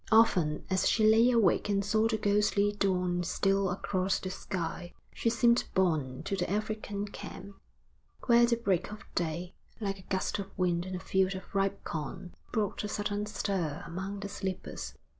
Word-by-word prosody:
Often 185 -9 +4
as 190 -1 +2
she 220 - +3
lay 225 +3 +6
awake 230 -3 +3
and 200 -1 +1
saw 215 +2 +3
the 225 -1 0
ghostly 205 0 +2
dawn 180 -3 0
steal 195 +2 +1
across 190 +1 0
the 185 - -4
sky, 175 -2 -4 0.2
she 230 - +1
seemed 235 +1 +3
borne 155 -9 +1
to 195 - -1
the 180 - -2
African 210 0 -2
camp, 200 0 -9 0.7
where 235 -1 +6
the 235 - +3
break 200 -4 0
of 215 - -8
day, 175 +1 -2 0.3
like 195 -3 -2
a 185 - -16
gust 190 +2 -1
of 195 -1 -5
wind 180 -1 +1
in 185 - -4
a - - -3
field 190 0 +1
of 190 - -9
ripe 195 0 0
corn, 175 +4 -5 0.2
brought 215 -4 -1
a - - -2
sudden 205 0 -2
stir 190 -7 -2
among 195 +3 -5
the 200 - -3
sleepers. 190 -2 -5
195 Hz, 175 wpm, -30 LUFS, 185-210 Hz, 0.7 s, lay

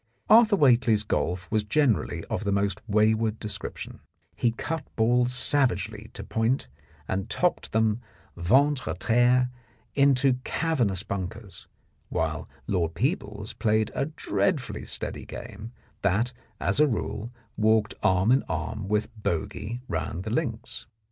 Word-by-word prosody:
Arthur 225 -1 +7
Whately's 120 - +4
golf 90 -3 -1
was 110 -1 +2
generally 105 - +1
of - - -3
the 100 - 0
most 100 -1 0
wayward 110 +1 +2
description; 105 -1 -5 0.4
he 120 - +2
cut 150 +7 -3
balls 120 +2 +3
savagely 110 -5 +1
to - - -7
point 115 +4 0 0.4
and 95 0 -2
topped - - 0
them 110 +1 +2 0.3
ventre 130 +10 +3
a - - 0
terre 125 +2 +3 0.4
into 135 -2 +4
cavernous 120 - 0
bunkers, 100 -1 -6 0.4
while - - -2 0.2
Lord 85 -3 0
Peebles 105 - -2
played 110 0 +1
a - - 0
dreadfully 155 -2 -1
steady - - -3
game, 110 +2 -8 0.3
that, 105 +6 +1 0.3
as 100 - +1
a 150 - +6
rule, 115 -2 -3 0.2
walked 110 -1 +3
arm 95 +4 +3
in 135 +2 +5
arm 110 -2 -3
with 105 +1 +1
bogey 100 +7 -3
round 85 +2 -3
the 110 - -4
links. 115 -4 -3
110 Hz, 130 wpm, -27 LUFS, 100-125 Hz, 0.4 s, Arthur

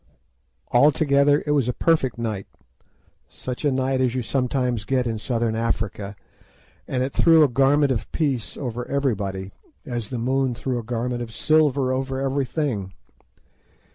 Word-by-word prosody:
Altogether 145 +2 +4
it 150 - 0
was 140 -5 +2
a - - 0
perfect 155 -6 +1
night, 110 -5 -3 0.8
such 125 +2 -7
a 145 - +3
night 130 0 0
as 130 -1 +1
you 125 - -1
sometimes 125 -2 -1
get 130 +3 0
in 115 -2 -2
Southern 115 -1 -1
Africa, 105 -3 -2 0.7
and 125 -1 -1
it 130 - -3
threw 165 -2 +6
a - - +5
garment 135 +2 +3
of 120 - -3
peace 140 -8 -2
over 125 -3 -4
everybody 100 -9 -2 0.3
as 120 -4 -4
the 125 - -4
moon 130 +1 0
threw 125 0 -2
a - - -6
garment 120 +1 -2
of 115 -2 -6
silver 140 -1 +2
over 130 0 -2
everything. 135 - -2
130 Hz, 150 wpm, -23 LUFS, 115-140 Hz, 0.8 s, threw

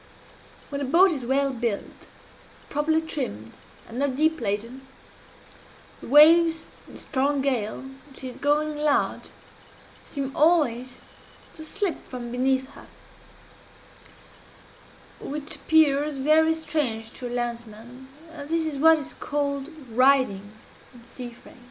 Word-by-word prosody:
_ - - -25
"When 280 0 -3
a - - -1
boat 350 +8 +5
is 265 -7 -4
well 275 +1 +1
built, 230 -4 -4 0.6
properly 315 +2 +1
trimmed, 110 - -5 0.4
and 235 +2 -7
not 280 -2 0
deep 315 +1 +1
laden, 230 +5 -3 1.2
the - - -9
waves 325 +3 +6 0.2
in - - -14
a - - -9
strong 280 0 -1
gale, 235 -6 -1
when 270 +1 -14
she 260 - -8
is 250 - -8
going 300 +1 0
large, 295 -1 0 0.7
seem 275 -2 -5
always 255 -6 +2 0.6
to 315 - -10
slip 345 +1 -3
from 240 -2 -7
beneath 260 +1 0
her - - -14 2.3
which 295 +1 -6
appears 300 -2 +3
very 310 +4 +3
strange 260 -9 -3
to 250 - -7
a - - -6
landsman 240 +1 -6 0.2
and 290 -3 -9
this 330 0 0
is 295 -3 -4
what 320 +2 +6
is 295 - -7
called 280 -1 -3 0.2
riding 245 -5 +2 0.4
in 235 -1 -16
sea 245 0 -8
phrase. 235 - -17
275 Hz, 135 wpm, -25 LUFS, 245-305 Hz, 2.3 s, waves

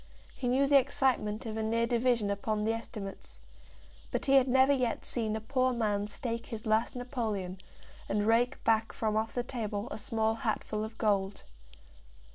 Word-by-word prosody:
He 250 - -3
knew 260 +3 +3
the 280 0 +6
excitement 255 -5 0
of 220 -1 -4
a - - -1
near 230 +1 +1
division 235 -3 +1
upon 210 +1 -1
the 225 +1 +1
estimates. 215 -3 -7 0.7
But - - -2
he 275 - +3
had 270 -1 +6
never 265 +2 +5
yet 250 -4 -1
seen 220 -3 0
a - - -2
poor 255 +3 +1
man 210 -3 0
stake 230 +1 -4
his 220 -1 -7
last 220 +3 +1
napoleon, 220 -8 -3 0.5
and 205 0 +1
rake 235 +3 +2
back 225 0 +2
from 215 -1 -1
off 220 +1 0
the 245 - 0
table 220 -3 -4
a - - -5
small 220 +1 0
hatful 220 -3 -2
of 220 +1 -7
gold. 200 -3 0
225 Hz, 175 wpm, -31 LUFS, 215-245 Hz, 0.7 s, the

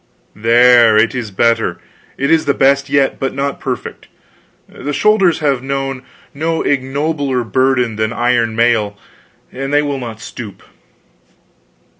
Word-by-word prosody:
There 115 0 +5
it 110 +1 +3
is 120 -4 -4
better 115 +4 0 0.4
it 140 +2 0
is 165 -1 +3
the 140 - +1
best 140 +1 +2
yet; 140 -1 +1
but 135 -1 -3
not 140 0 -3
perfect. - - -6 0.6
The 145 +3 -6
shoulders 195 -3 +2
have 140 -4 0
known 135 -1 -3 0.3
no 160 +3 -2
ignobler 140 -1 -1
burden 125 0 0
than 110 +1 -1
iron 120 -2 0
mail, 115 -3 +1 0.5
and 135 +2 -5
they 145 0 +3
will 140 -2 -3
not 115 -3 -7
stoop." 110 -3 -9
130 Hz, 135 wpm, -16 LUFS, 115-140 Hz, 0.6 s, There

